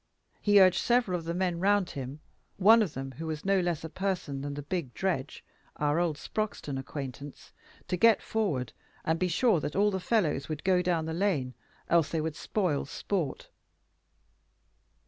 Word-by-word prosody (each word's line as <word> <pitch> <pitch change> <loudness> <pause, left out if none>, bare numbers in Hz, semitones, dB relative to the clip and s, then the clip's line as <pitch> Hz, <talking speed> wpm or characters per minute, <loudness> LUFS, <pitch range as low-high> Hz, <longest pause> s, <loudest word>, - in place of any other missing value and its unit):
He 205 -1 +5
urged 185 -1 +6
several 240 -6 +2
of 165 - -11
the 170 - -2
men 180 -2 0
round 200 0 +2
him, 135 +2 -6 0.4
one 220 +4 +7
of 195 -8 -1
whom 135 0 -5
was 160 0 -4
no 195 0 +3
less 175 -4 -1
a 160 - -5
person 180 -7 -3
than 140 0 -4
the 145 - -5
big 150 -5 -4
Dredge, 165 -8 -2 0.3
our 150 +2 +1
old 170 -4 0
Sproxton 175 -9 -3
acquaintance, 140 0 -8 0.3
to 180 - -1
get 230 +3 +5
forward, 160 - -2 0.3
and 160 +1 +1
be 185 - +2
sure 185 +2 +3
that 150 - -4
all 205 +2 +3
the 190 - -1
fellows 175 - 0
would 155 -1 -4
go 185 -1 +3
down 175 -3 0
the 160 - -3
lane, 165 -9 0 0.3
else 165 -3 +3
they 165 - -1
would 155 0 -2
spoil 180 -9 -1
sport. 160 +2 -3
170 Hz, 175 wpm, -29 LUFS, 145-190 Hz, 0.4 s, one